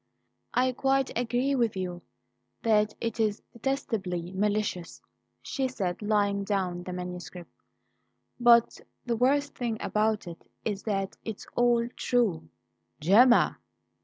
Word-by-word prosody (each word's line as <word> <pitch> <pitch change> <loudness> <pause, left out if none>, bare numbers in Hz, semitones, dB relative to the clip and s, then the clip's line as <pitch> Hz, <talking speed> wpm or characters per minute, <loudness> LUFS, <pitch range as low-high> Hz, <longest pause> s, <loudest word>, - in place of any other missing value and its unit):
"I 255 +1 +3
quite 270 +1 0
agree 245 +3 0
with 235 -6 +1
you 180 -1 -4 0.6
that 215 -2 +3
it 230 0 -3
is 215 -2 0
detestably 210 -9 -2
malicious," 205 -3 -1 0.4
she 270 -1 -1
said, 195 -8 -3
laying 205 -1 +1
down 190 -3 -1
the 180 - -7
manuscript. 180 -1 -7 0.9
"But 235 -1 +5 0.2
the 235 -2 0
worst 280 +4 +2
thing 235 -3 -3
about 215 0 0
it 170 -1 -9 0.2
is 205 -3 -2
that 195 -3 -2
it's 220 -2 -6
all 240 -1 +3
true." 230 - 0 0.5
"Gemma!" 235 - +5
215 Hz, 120 wpm, -28 LUFS, 190-240 Hz, 0.9 s, But